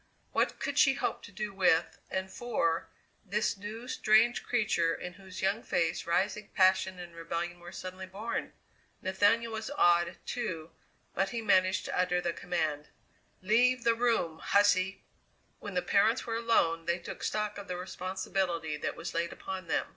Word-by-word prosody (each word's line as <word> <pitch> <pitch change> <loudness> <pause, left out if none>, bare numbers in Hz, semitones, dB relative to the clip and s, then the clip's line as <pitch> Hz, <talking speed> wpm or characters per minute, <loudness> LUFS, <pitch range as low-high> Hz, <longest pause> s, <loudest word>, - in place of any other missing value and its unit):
What - - +1
could - - -1
she 270 -2 +6
hope - - -2
to - - -12
do 210 0 -4
with, 180 -3 +2
and 190 0 -3
for, 170 -7 -1 0.3
this 210 +1 0
new, 215 +4 -7
strange 230 0 +4
creature 200 -8 +1
in 180 - -7
whose 190 -1 -9
young 200 +4 +1
face 165 -4 0
rising 200 +4 0
passion 190 -1 +4
and 175 -1 -9
rebellion 170 +1 -4
were 175 0 -10
suddenly 185 0 -7
born? 205 +5 -4 0.5
Nathaniel 215 +5 +2
was 220 0 -4
awed, 175 -10 +3
too, 165 -9 -4 0.4
but 195 0 +1
he 235 - -3
managed 185 -3 +3
to - - -3
utter 180 -1 +2
the 175 -1 -1
command: 155 -5 -2 0.6
"Leave 245 +5 +3
the 230 - +4
room, 225 -9 +1
hussy!" 200 -1 +3 0.6
When - - -7
the - - +1
parents - - +3
were 230 -1 -1
alone 165 -8 +2
they 170 0 +1
took 175 - -8
stock 210 -1 -2
of 200 - -9
the 180 - -3
responsibility 185 -3 -2
that - - -3
was - - -6
laid 170 0 -1
upon 190 -2 -6
them. - - 0
190 Hz, 165 wpm, -31 LUFS, 175-215 Hz, 0.6 s, she